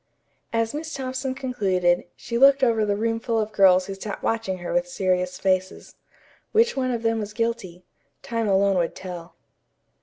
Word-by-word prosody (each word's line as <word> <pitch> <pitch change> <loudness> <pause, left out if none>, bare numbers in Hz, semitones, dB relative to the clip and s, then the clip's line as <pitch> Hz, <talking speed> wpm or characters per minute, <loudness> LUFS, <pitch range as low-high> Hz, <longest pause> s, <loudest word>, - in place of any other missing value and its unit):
As 230 -1 0
Miss 310 +1 -5
Thompson 260 0 -3
concluded, 195 -10 0
she 235 - -6
looked 275 +2 +6
over 225 -3 +3
the 205 - +1
roomful 225 +2 -1
of 215 -1 -1
girls 185 -2 +5
who 195 - -5
sat 195 +1 -7
watching 225 -5 -1
her 175 -1 -5
with 265 0 +1
serious 185 -7 -1
faces. 185 -1 -1 0.6
Which 460 +2 +3
one 260 -1 0
of 235 -2 -2
them 225 0 +1
was 210 -1 -5
guilty? 210 -6 -3 0.4
Time 230 -2 -2
alone 195 -1 +3
would 170 - -1
tell. 180 -2 -8
220 Hz, 170 wpm, -24 LUFS, 185-250 Hz, 0.6 s, looked